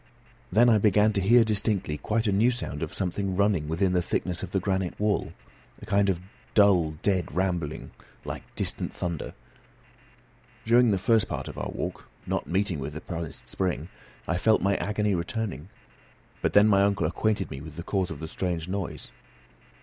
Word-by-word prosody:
Then 115 +5 +5
I 110 -3 +5
began 105 +1 +4
to 100 - +1
hear 115 +5 +6
distinctly 105 -7 0
quite 110 +10 -1
a 105 - +2
new 105 +5 +4
sound 120 -12 -4
of - - -3
something 95 +1 -2
running 100 -6 +2
within 90 +4 +1
the 90 - +3
thickness 90 0 -2
of 95 - -6
the 95 - +1
granite 95 -1 -2
wall, 105 -1 0 0.5
a - - -10
kind 100 -1 +2
of 90 -3 0 0.4
dull, 95 -7 +5
dead 95 -4 +1
rumbling, 90 -5 -2 0.3
like - - -5
distant - - -2
thunder. 85 -3 -4 1.3
During 120 +1 +5
the 100 - +2
first 110 +3 +2
part - - -4
of - - -7
our - - -3
walk, - - -5 0.2
not - - -2
meeting 95 -3 0
with 70 +2 -5
the 80 - -6
promised 85 -3 -6
spring, 90 -3 -2 0.4
I 85 - 0
felt 110 +4 +3
my 100 +1 +3
agony 105 0 0
returning; 95 - -3 0.7
but - - 0
then 105 +1 +7
my 100 -2 +5
uncle 100 -4 +2
acquainted 105 +6 0
me 65 - -6
with 75 0 -10
the 85 - -6
cause 95 -1 -1
of - - -6
the 80 - -5
strange 85 -1 -3
noise. 95 0 -4
95 Hz, 180 wpm, -27 LUFS, 85-105 Hz, 1.3 s, then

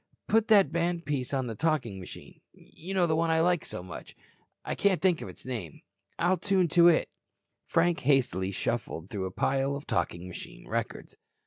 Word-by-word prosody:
Put 225 0 +3
that 205 -3 +5
band 170 0 -1
piece 135 -4 -2
on 135 -2 0
the 115 - -4
talking 125 -7 -1
machine. 90 - -11
You 185 +4 -9
know 180 -2 +4
the 160 -2 +1
one 165 +1 +1
I 160 0 +3
like 175 -1 +2
so 90 - -6
much. 90 -8 -10 0.5
I - - -2
can't 200 -4 +2
think 180 -1 +2
of - - -6
its 90 - -12
name. 115 - -6 0.4
I'll 180 +2 +2
tune 185 -2 +2
to 170 +2 +6
it." 170 - +4 0.6
Frank 170 0 +2
hastily 125 -9 +2
shuffled 100 -3 -3
through 100 -3 -3
a 95 - -4
pile 135 +6 0
of 140 - -7
talking 85 +1 -2
machine 90 -8 -10
records. - - -4
145 Hz, 190 wpm, -29 LUFS, -, 0.6 s, to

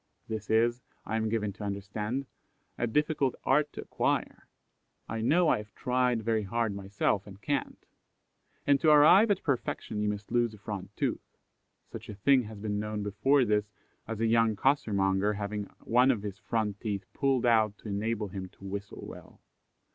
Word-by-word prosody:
This 110 -1 -5
is, 120 +2 +2 0.2
I 110 - -3
am 110 0 0
given 105 -2 -1
to 105 - -9
understand, 105 +6 -3 0.5
a 120 - -1
difficult 150 +1 +1
art 150 +2 +2
to - - -6
acquire - - -1 0.6
I 115 - -3
know 165 +9 +3
I - - +4
have 105 0 -11
tried 125 -3 +1
very 110 0 +1
hard 110 +1 -1
myself 100 0 -1
and 100 -1 -11
can't; 145 +6 -3 0.8
and 140 -1 +4
to 160 - +4
arrive 155 +9 +7
at 200 -2 +1
perfection 120 -6 -2
you 105 - +1
must 105 0 -5
lose 120 -2 +1
a - - -15
front 100 -2 -6
tooth. - - -3 0.5
Such - - -8
a 105 - -6
thing 130 +6 +4
has 110 0 -9
been 105 0 -2
known 105 0 -3
before 135 +7 +3
this, 105 -1 +1 0.4
as 110 -1 -4
a 115 - +2
young 115 -1 +3
costermonger 100 -5 +2
having 105 0 -3 0.2
one 125 +3 +4
of 115 -6 +1
his 100 -1 -6
front 110 -3 -2
teeth 100 -4 -3
pulled 135 -3 +1
out 110 -3 +3
to - - -11
enable 105 +1 -2
him 95 -1 -6
to - - -19
whistle 100 +1 -6
well. - - -12
110 Hz, 180 wpm, -29 LUFS, 105-125 Hz, 0.8 s, arrive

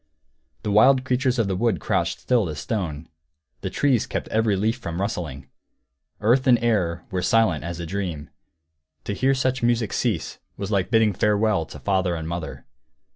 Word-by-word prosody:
The 105 - -1
wild 130 +5 +5
creatures 130 0 +1
of 115 -4 +1
the 95 - -1
wood 100 -3 +1
crouched - - 0
still 115 -8 +1
as 75 - -5
stone; 85 -6 -3 0.5
the - - -4
trees 135 -6 +1
kept - - -3
every 110 -2 +2
leaf 110 +5 0
from 85 -8 -5
rustling; 80 - -4 0.7
earth 120 +5 +3
and 125 -2 +6
air 90 -7 0
were 90 -1 -1
silent 95 -5 +2
as 85 0 -5
a 85 - -4
dream. 85 -5 -4 0.7
To 105 - -3
hear 135 +6 +2
such 130 -1 0
music 120 -3 +1
cease 110 -10 -1 0.2
was 100 +1 -4
like 100 -3 +1
bidding 110 -2 +3
farewell 105 -4 +1
to - - -10
father 95 -3 0
and 80 -1 -5
mother. 85 -1 -5
100 Hz, 175 wpm, -24 LUFS, 85-120 Hz, 0.7 s, and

